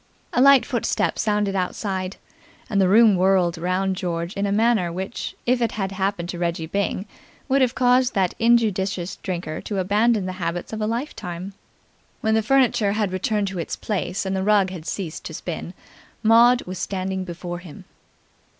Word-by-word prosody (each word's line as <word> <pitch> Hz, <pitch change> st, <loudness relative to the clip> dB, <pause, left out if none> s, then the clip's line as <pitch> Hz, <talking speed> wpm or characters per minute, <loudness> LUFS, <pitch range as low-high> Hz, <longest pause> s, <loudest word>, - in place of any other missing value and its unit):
A 245 Hz, -, +3 dB
light 275 Hz, -1 st, +7 dB
footstep 245 Hz, -4 st, -1 dB
sounded 210 Hz, -2 st, 0 dB
outside, 185 Hz, 0 st, -2 dB, 0.6 s
and 200 Hz, -2 st, +3 dB
the 190 Hz, -, +4 dB
room 220 Hz, 0 st, +6 dB
whirled 185 Hz, -2 st, +3 dB
round 185 Hz, +2 st, 0 dB
George 170 Hz, 0 st, -3 dB
in 200 Hz, +1 st, -1 dB
a -, -, -1 dB
manner 215 Hz, -4 st, +2 dB
which, 190 Hz, +6 st, -5 dB
if 245 Hz, 0 st, +2 dB
it 230 Hz, -, 0 dB
had 195 Hz, -2 st, -2 dB
happened 190 Hz, -2 st, -2 dB
to 175 Hz, -, -5 dB
Reggie 170 Hz, -2 st, -1 dB
Byng, 200 Hz, +2 st, -2 dB, 0.4 s
would 275 Hz, 0 st, +2 dB
have 255 Hz, -1 st, +2 dB
caused 250 Hz, 0 st, +3 dB
that 190 Hz, -3 st, +1 dB
injudicious 200 Hz, -6 st, +1 dB
drinker 175 Hz, -4 st, -4 dB
to 205 Hz, -, -4 dB
abandon 210 Hz, +2 st, +2 dB
the 185 Hz, -, -3 dB
habits 170 Hz, +4 st, -3 dB
of 220 Hz, -, -4 dB
a 215 Hz, -, 0 dB
lifetime. 195 Hz, -, -4 dB, 0.7 s
When 220 Hz, -, +1 dB
the 220 Hz, -, +3 dB
furniture 240 Hz, -4 st, +2 dB
had 210 Hz, -3 st, -1 dB
returned 200 Hz, +2 st, 0 dB
to 190 Hz, -2 st, -5 dB
its 165 Hz, -, -3 dB
place 195 Hz, -2 st, -3 dB
and 190 Hz, 0 st, -1 dB
the 190 Hz, -, -1 dB
rug 200 Hz, -2 st, +3 dB
had 170 Hz, -3 st, -8 dB
ceased 175 Hz, -6 st, -4 dB
to 160 Hz, -, -6 dB
spin, 175 Hz, +2 st, -6 dB, 0.5 s
Maud 235 Hz, +3 st, +6 dB
was 185 Hz, 0 st, -7 dB
standing 190 Hz, 0 st, -3 dB
before 175 Hz, 0 st, -6 dB
him. 175 Hz, -4 st, -12 dB
195 Hz, 175 wpm, -23 LUFS, 180-220 Hz, 0.7 s, light